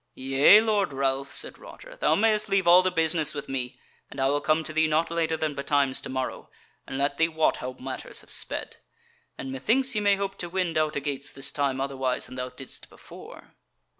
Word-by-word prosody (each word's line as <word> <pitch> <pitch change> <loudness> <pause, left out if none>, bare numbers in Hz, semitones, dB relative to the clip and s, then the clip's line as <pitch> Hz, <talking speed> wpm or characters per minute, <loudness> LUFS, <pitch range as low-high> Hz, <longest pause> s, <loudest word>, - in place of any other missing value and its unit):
"Yea, 135 +10 +6
Lord 205 -7 0
Ralph," 135 0 -1
said - - 0
Roger, - - -12
"thou - - +2
mayest 215 0 +2
leave 195 -1 +2
all 175 +1 +8
the 185 - +1
business 160 -3 0
with 145 - -5
me, 130 -2 -4 0.3
and - - -9
I 135 0 +2
will 145 +1 +1
come 155 +1 +1
to 155 - -5
thee 160 0 +3
not 160 +2 +1
later 165 -1 0
than 155 -1 -2
betimes 140 -1 0
to - - -7
morrow, 130 -1 -4 0.4
and 135 - -5
let 140 +1 0
thee 165 - +4
wot 160 -1 +1
how 130 0 -5
matters 130 +1 -6
have - - -14
sped. - - -3 0.6
And 135 - -6
methinks 255 - +1
ye 210 - 0
may 205 -1 +4
hope 195 0 -4
to 175 - -3
wend 180 -2 -1
out 155 -1 +1
a - - 0
gates 140 0 -4
this 135 +1 -6
time 140 -2 -1
otherwise 135 -2 -1
than - - -8
thou 125 0 -4
didest 130 +1 -10
before." - - -14
150 Hz, 215 wpm, -26 LUFS, 135-180 Hz, 0.6 s, all